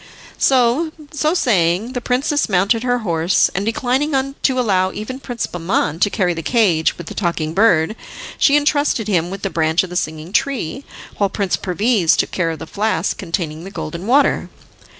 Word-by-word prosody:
So 260 +5 +3 0.2
saying 235 - +1
the 245 - -3
princess 270 +4 0
mounted 200 +4 +2
her 245 0 +1
horse, 170 +1 +2
and, 195 - -1
declining 265 +5 0
to 260 -2 +1
allow 190 -6 +1
even 235 +7 -6
Prince 245 -5 -4
Bahman 165 -2 -1
to 205 - +3
carry 180 -3 0
the 165 - -5
cage 175 -5 +2
with 170 - -8
the - - -7
Talking 170 -4 -2
Bird, 190 -2 +3 0.4
she 285 0 +5
entrusted 290 -6 +1
him 175 -4 +1
with 195 +1 -7
the 195 - -2
branch 160 +1 +1
of 185 - -7
the - - -6
Singing 160 +1 -3
Tree, 265 - -1 0.4
while 200 -1 +2
Prince 195 -1 -1
Perviz 195 -2 +1
took - - 0
care 175 -3 0
of 165 - -4
the - - -8
flask 215 +2 -1
containing 165 -3 -4
the 190 - -7
Golden 170 -1 -6
Water. 280 +4 +2
200 Hz, 175 wpm, -19 LUFS, 170-250 Hz, 0.4 s, she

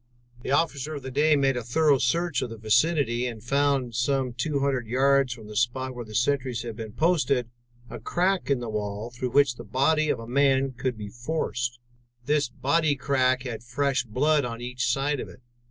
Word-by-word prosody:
"The - - -6
officer 150 0 0
of 140 - -7
the 130 - -6
day 150 +3 +3
made 135 -2 +2
a 125 - -2
thorough 140 +4 +2
search 165 +3 +1
of 125 - -3
the 115 - -8
vicinity 120 +2 +2
and 115 -3 -7
found, 140 -1 +1
some 130 +1 0
two 140 +4 -1
hundred 135 -4 0
yards 135 +2 +3
from 115 -3 -7
the 105 0 -10
spot 130 +3 0
where 120 -1 -6
the 110 -1 -10
sentries 125 0 0
had 115 -2 -6
been 110 -1 -7
posted, 140 -6 +1 0.4
a - - -8
crack 185 0 0
in 135 -3 +1
the 120 - -4
wall 105 +1 -4
through 125 +1 -3
which 135 -2 +3
the 120 - -8
body 145 +7 +1
of - - +1
a 115 - -7
man 135 +1 +2
could 125 -1 -3
be 105 -1 -6
forced. 120 0 -3 0.5
This 145 -2 +1
bodycrack 140 -3 +1
had 120 -4 -5
fresh 130 +2 0
blood 145 +6 +1
on 115 -1 -4
each 125 0 -3
side 140 +2 0
of - - -6
it. 125 - -16
130 Hz, 200 wpm, -26 LUFS, 120-140 Hz, 0.5 s, day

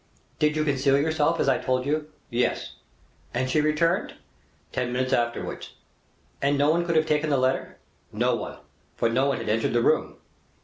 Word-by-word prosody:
"Did 150 0 +2
you 155 - +1
conceal 140 -1 +2
yourself 155 +2 +1
as - - +1
I 135 - +3
told 130 0 0
you?" 150 +1 -1 0.2
"Yes." 120 +1 -1 0.6
"And 130 +1 0
she 155 - +3
returned?" 155 +3 +1 0.6
"Ten 125 -1 -2
minutes 130 +1 -1
afterwards." 120 0 -2 0.7
"And 140 +1 +2
no 145 +2 +4
one 170 +1 0
could 170 - 0
have 155 0 +4
taken 150 0 +1
the 140 - +2
letter?" 130 +1 0 0.3
"No - - +1
one; - - -6 0.4
for 115 - +1
no 130 +4 +2
one 140 - 0
had - - -6
entered 115 +2 +1
the 120 0 +2
room." - - +1
140 Hz, 180 wpm, -25 LUFS, 130-155 Hz, 0.7 s, no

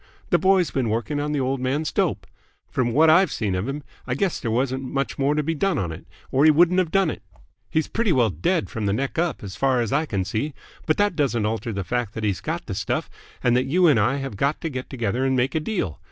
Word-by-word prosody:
The 175 - +4
boy's 190 0 +3
been 130 -4 0
working 120 +7 -1
on 150 +1 -2
the 150 - 0
old 135 0 0
man's 140 +4 -1
dope. - - 0 0.5
From 120 -2 0
what 155 +7 +5
I've 165 +2 +5
seen 105 -4 -1
of 90 +5 -2
him, 145 +2 -4 0.2
I 125 - -1
guess 185 +4 0
there 115 - -3
wasn't 130 +3 0
much 135 +2 -3
more 140 +2 +2
to 150 - +1
be 165 +3 -1
done 195 +5 0
on 85 -4 -2
it, 80 - -10 0.2
or 135 - +3
he 155 - +8
wouldn't 175 +4 +5
have 180 -3 +1
done 195 -2 +2
it. - - -8 0.5
He's 160 0 0
pretty 225 -4 0
well 120 -8 +3
dead 150 - 0
from 110 -4 -3
the 100 - +1
neck 135 +7 -2
up, 170 -7 -1
as 95 -2 -7
far 135 -2 +2
as 115 -1 -1
I 155 +3 +1
can 95 -6 -1
see. 110 +10 -3 0.3
But 155 - +2
that 205 -3 +2
doesn't 120 -8 +1
alter 115 +2 -2
the 100 -2 -3
fact 120 +1 -2
that 110 - -4
he's 100 -5 0
got - - -3
the - - -5
stuff - - -2 0.3
and 120 -1 +3
that 125 - +2
you 180 +6 +3
and 145 -8 +5
I 115 +6 +2
have 135 -7 -5
got 140 +7 0
to 165 - -2
get 130 -3 -6
together 120 -1 -1
and 135 0 +2
make 130 +1 +1
a 160 - +1
deal. 155 - -3
135 Hz, 265 wpm, -23 LUFS, 115-155 Hz, 0.5 s, he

